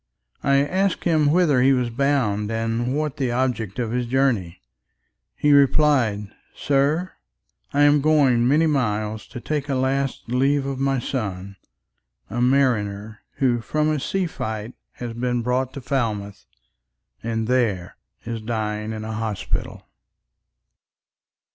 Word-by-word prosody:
—I 140 0 +3
asked 190 +4 0
him 155 -4 +3
whither 155 -6 +3
he 135 +2 +5
was 125 -2 0
bound, 115 -6 0
and 115 +4 -1
what 150 -2 -2
The 130 -3 0
object 120 -5 -1
of 120 -3 -2
his 125 0 -1
journey; 120 -9 0 0.8
he 150 - +2
replied 135 -7 +3 0.2
"Sir! 145 +6 +1 0.6
I 145 - +1
am 145 0 +5
going 135 -6 +3
many 150 +5 +4
miles 110 -7 -1
to 125 - -8
take 150 +2 -3
A 135 - +1
last 135 +1 -1
leave 135 +3 +1
of 135 -1 -3
my 135 0 +1
son, 100 -6 -4 0.8
a 120 +3 -2
mariner, 110 -5 +1 0.2
Who 120 -3 +1
from 155 +6 0
a 155 - 0
sea 190 +7 -1
fight 110 -7 -5 0.2
has 120 -2 -6
been 120 0 -1
brought 125 +2 0
to 140 - -7
Falmouth, 110 -6 -3 0.7
And 115 -1 -2
there 115 -8 0 0.3
is 115 -1 -4
dying 110 -1 -3
in 110 0 -5
an 110 - -4
hospital." 110 -2 -4
125 Hz, 135 wpm, -23 LUFS, 110-140 Hz, 0.8 s, he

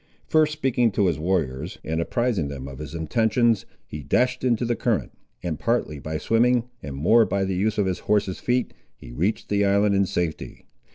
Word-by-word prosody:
First 155 -1 +3
speaking 130 -6 +1
to 100 - +2
his 85 -4 +1
warriors, 80 -7 -1
and 80 +1 -1
apprising 115 -4 0
them 70 -1 -7
of 65 -1 -9
his 75 +2 -7
intentions, 110 +5 +1 0.2
he 75 - -7
dashed 125 - +1
into 120 -1 +1
the 120 0 0
current, 115 -4 -1 0.3
and 80 -4 -3
partly 115 -11 -1
by 80 +2 -4
swimming, 120 +5 +2 0.2
and 70 -2 -6
more 110 +12 +5
by 100 -2 0
the 95 - -2
use 100 +4 0
of 105 - +2
his 95 -1 -1
horse's 100 -3 0
feet, 125 +1 0 0.2
he - - -12
reached 105 - -1
the 100 0 +2
island 100 +1 +3
in 100 -1 +2
safety. 85 -3 -4
100 Hz, 190 wpm, -24 LUFS, 80-120 Hz, 0.3 s, more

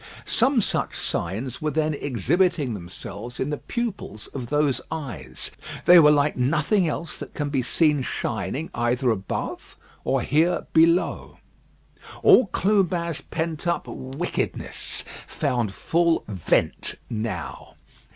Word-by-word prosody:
Some 255 0 +3
such - - -1
signs 115 +9 -3
were 155 - 0
then 155 +1 0
exhibiting 145 - +1
themselves 100 +5 -7
in 140 - -1
the 150 - -2
pupils 200 - -4
of 130 -4 -5
those 145 -2 +1
eyes. 110 - -5 0.3
They 175 0 +9
were 150 -2 +8
like 145 0 +3
nothing 155 - +2
else 155 +1 -4
that - - -8
can 145 -1 -2
be 135 -3 +1
seen 150 +3 +2
shining 120 - -3
either 120 +1 +1
above 100 -3 -4 0.3
or 135 -2 +1
here 160 +5 +2
below. 165 +3 +3 0.9
All 250 - +7
Clubin's 180 -4 +1
pent 160 0 -3
up 170 - 0
wickedness 135 +7 -4 0.2
found 120 -5 -1
full 170 - +1
vent 95 -6 0
now. 110 - -5
145 Hz, 120 wpm, -24 LUFS, 120-170 Hz, 0.9 s, They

